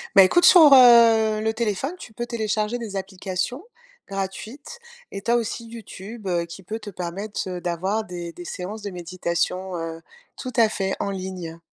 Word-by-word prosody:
Bah, 195 - +10
écoute, 350 - +3
sur, 315 -6 +9
heu, 230 -4 +7
le 220 0 0
téléphone, 225 - -2
tu 220 - -11
peux 240 +2 -4
télécharger 220 0 -2
des 220 -4 -6
applications 190 - -4 0.4
gratuites 215 - -6 0.3
et 195 - -6
tu 220 - -5
as 235 - +5
aussi 230 0 -3
YouTube, 225 -1 -10
heu, 175 -2 0
qui 170 +3 -11
peut 215 +5 -5
te 210 -1 -8
permettre, 190 +3 -5
heu, 180 -1 -5
d'avoir 185 +6 -1
des 175 -3 -7
des 175 - -10
séances 195 +5 -6
de 205 - -5
méditation, 180 +1 -3
heu 165 0 -5 0.3
tout 255 - -6
à 230 -2 +5
fait, 195 -2 -2
en 200 - -2
ligne. 185 -3 -6
200 Hz, 180 wpm, -23 LUFS, 185-230 Hz, 0.4 s, Bah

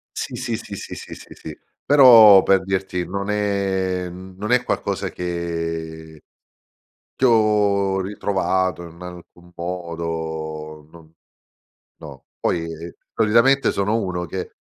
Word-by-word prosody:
Sì, - - -5
sì, 125 -3 -3
sì, 100 - -9
sì, - - -8
sì, - - -9
sì, - - -13
sì. - - -10 0.3
Però 115 -8 +8
per 95 -1 +3
dirti 95 -2 -2
non 100 +3 -4
è 95 -3 -1
mhmm, 95 +1 -11
non 105 +4 -4
è 125 0 +3
qualcosa - - -2
che 80 -2 -5 1.0
che 130 - +3
ho 105 -4 +2
ritrovato 95 -2 -1
in 85 +2 -15
alcun 90 0 -12
modo 80 -3 -5
non 80 -1 -17 0.9
no, 70 -4 -12
poi, 85 - 0
ehm, 85 +1 -7 0.2
solitamente 115 +5 +3
sono 105 +3 0
uno 90 -3 -3
che, 90 +1 -6
95 Hz, 125 wpm, -21 LUFS, 85-100 Hz, 1.0 s, Però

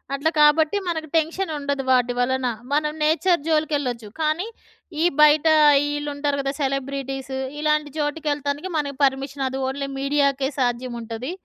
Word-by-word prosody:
అట్లా 285 +3 +1
కాబట్టి 310 +5 +4
మనకు 320 -2 -2
టెన్షన్ 325 +3 0
ఉండదు 280 -1 -2
వాటి 250 -1 +3
వలన. 255 +1 +1 0.3
మనం 300 0 +1
నేచర్ 340 +3 +2
జోలికెళ్ళొచ్చు. 285 -8 0
కానీ, 315 +7 0 0.6
ఈ - - +4 0.2
బయట 300 +1 +6 0.5
ఈళ్ళు 290 0 -3
ఉంటారు 285 0 -1
కదా 275 0 -1
సెలబ్రిటీస్. 270 -1 -3 0.2
ఇలాంటి 300 -1 0
చోటుకి 300 +1 -2
యేళ్తానికి 290 +4 -3
మనకి 280 -3 -3
పర్మిషన్ 270 +1 -2
అది 265 +1 -4
ఓన్లీ 275 +1 -4
మీడియాకే 275 -1 +1
సాధ్యం 245 0 -1
ఉంటది. 230 +5 -5
285 Hz, 140 wpm, -23 LUFS, 265-305 Hz, 0.6 s, బయట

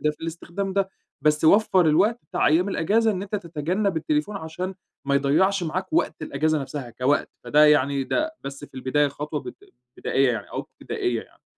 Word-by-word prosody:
ده 150 - +2
في 150 - -12
الاستخدام 170 +4 -4
ده. 195 0 +1 0.3
بس 150 +2 +2
وفَّر 190 0 +5
الوقت 205 +10 +3
بتاع - - +1
أيّام 165 +6 +3
الإجازة 215 +5 +2
إن 190 -3 -2
أنت 205 +1 -3
تتجنب 175 +2 -2
التليفون 155 +5 -1
عشان 180 +2 -5 0.3
ما 140 0 +1
يضيَّعش 165 +8 +2
معاك 185 - -3
وقت 335 - 0
الإجازة 155 - 0
نفسها 135 -2 -6
كوقت، 130 +4 +1 0.2
فده 150 +1 +5
يعني 140 -2 +3
ده 315 - -1
بس 140 +1 -7
في - - -18
البداية 140 +3 +1
خطوة 150 +2 -4
بد 370 - -8 0.4
بدائية - - +2
يعني - - -5
أو - - -3
ابتدائية 410 -5 -3
يعني. - - -24
160 Hz, 180 wpm, -24 LUFS, 150-195 Hz, 0.4 s, وفَّر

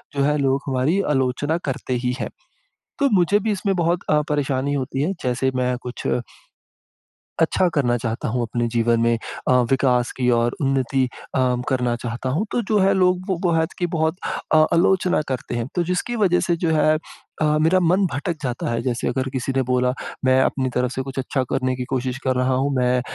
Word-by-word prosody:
जो 140 - 0
है 150 +1 +2
लोग 135 -1 +1
हमारी 135 +8 +1
आलोचना 140 +4 0
करते 130 -1 -3
ही 125 - +1
हैं। - - -3 0.7
तो 280 -1 +3
मुझे 195 +2 +4
भी 220 +2 -1
इसमें 195 -1 0
बहुत 175 0 +1
अ, 150 0 +4
परेशानी 140 -1 0
होती 135 -1 -2
है 180 +7 0
जैसे 130 +1 0
मैं 125 0 +1
कुछ 125 0 -5 1.4
अच्छा 180 +3 +2
करना 120 -5 +2
चाहता 115 +3 -3
हूँ 120 +1 -1
अपने 120 +1 -1
जीवन 115 0 +2
में, 115 0 +3 0.3
अ, - - +5 0.2
विकास 125 -2 +2
की 125 -1 0
और 120 0 +2
उन्नति 135 -1 +1 0.3
अ, - - +1 0.3
करना 125 -2 0
चाहता 120 +2 -4
हूँ। 170 +12 0
तो 240 - +1
जो 215 - +4
है 195 +1 +4
लोग 180 -1 +2
वो 190 - +1
बोहज 165 0 +1
की 175 - +1
बहुत 160 +2 +1 0.4
अ, 155 0 +7
आलोचना 180 0 +3
करते 130 -2 -3
हैं। 115 0 -2
तो 175 - +1
जिसकी 180 +7 -2
वज़ह 185 -5 +3
से 170 - +2
जो - - +2
है 155 +1 +3 0.4
अ, - - +3 0.2
मेरा 165 +4 +4
मन 180 +3 +3
भटक 155 +5 -2
जाता 125 -3 -2
है। 115 0 -1
जैसे 120 -1 -1
अगर 130 0 -1
किसी 130 0 -2
ने 135 - +3
बोला 125 0 +2 0.3
मैं 130 0 +4
अपनी 130 -1 0
तरफ 125 0 +1
से 130 - -3
कुछ 135 0 -7
अच्छा 135 +1 -1
करने 130 0 0
की 125 - -3
कोशिश 130 -1 -2
कर 130 -1 +1
रहा 125 +1 +1
हूँ। 135 +2 +1
मैं 125 0 +2
135 Hz, 200 wpm, -22 LUFS, 125-165 Hz, 1.4 s, अ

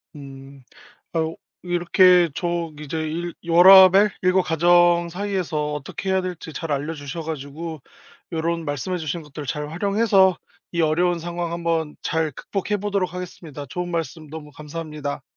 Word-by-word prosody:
음. 135 -1 -12 0.5
어 160 -1 0 0.3
이렇게 175 0 +4
저 170 -2 -2
이제 150 +1 -5
일 165 +2 -3
워라밸 190 +3 +8
일과 185 0 +3
가정 175 +1 +3
사이에서 175 -6 -2
어떻게 150 +6 -5
해야 190 0 +2
될지 175 -3 -6
잘 165 -1 -5
알려주셔 145 +2 -4
가지고 155 0 -6 0.5
요런 165 0 -2
말씀해 145 +6 -3
주신 160 +1 -4
것들을 150 -1 -9
잘 150 +2 -3
활용해서 195 +1 +3 0.3
이 170 -1 0
어려운 170 +2 +2
상황 170 0 -4
한번 165 -2 -1
잘 160 -1 -1
극복해 200 +8 -3
보도록 200 -3 -2
하겠습니다. 165 -5 -8
좋은 180 +5 -4
말씀 160 -2 -4
너무 150 -1 -9
감사합니다. 150 -2 -6
165 Hz, 315 characters per minute, -22 LUFS, 150-180 Hz, 0.5 s, 워라밸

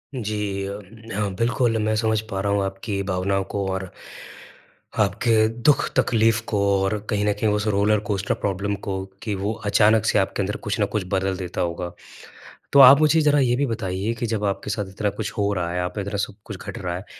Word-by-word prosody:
जी 105 -4 -3
अम, 100 +1 -6 0.3
हाँ, 100 -1 -1
बिल्कुल, 115 +1 +1
मैं 110 0 +1
समझ 110 0 +1
पा 95 -3 -3
रहा 100 0 0
हूँ 100 -1 +1
आपकी 100 +1 -3
भावनाओं 95 0 0
को 100 -1 -1
और 95 -1 -4 1.1
आपके 110 +2 +3 0.2
दुःख-तकलीफ़ 115 -5 +3
को, 105 - 0 0.2
और 95 +2 0
कहीं 105 -1 0
न 105 - +2
कहीं 105 +1 0
उस 105 +1 -1
रोलर 105 +1 +2
कोस्टर 100 -1 0
प्रॉब्लम 100 +1 -2
को 95 -1 -2 0.2
कि 105 -3 -2
वो 100 +3 -2 0.2
अचानक 110 +1 +4
से 105 - +3
आपके 95 +1 -1
अंदर 105 +2 -3
कुछ 105 - -1
न - - +4
कुछ 105 - +1
बदल 95 0 0
देता 90 -2 -4
होगा। 85 0 -3 0.8
तो 140 - +7
आप 135 +2 +10
मुझे 155 +1 +4
ज़रा 145 -1 +4
ये 125 -3 +3
भी 140 - +1
बताइए 105 -3 -2
कि, 120 +1 -4
जब 110 -2 -1
आपके 100 +1 -2
साथ 105 0 -2
इतना 105 +2 -1
कुछ 110 +1 -2
हो 100 0 +1
रहा 85 -3 -2
है, 90 - -1
आप 90 +4 -3
इतना 100 +1 -3
सब 100 - -3
कुछ 105 - -7
घट - - -5
रहा 90 -2 -3
है, 95 +3 -7
105 Hz, 210 wpm, -23 LUFS, 95-110 Hz, 1.1 s, आप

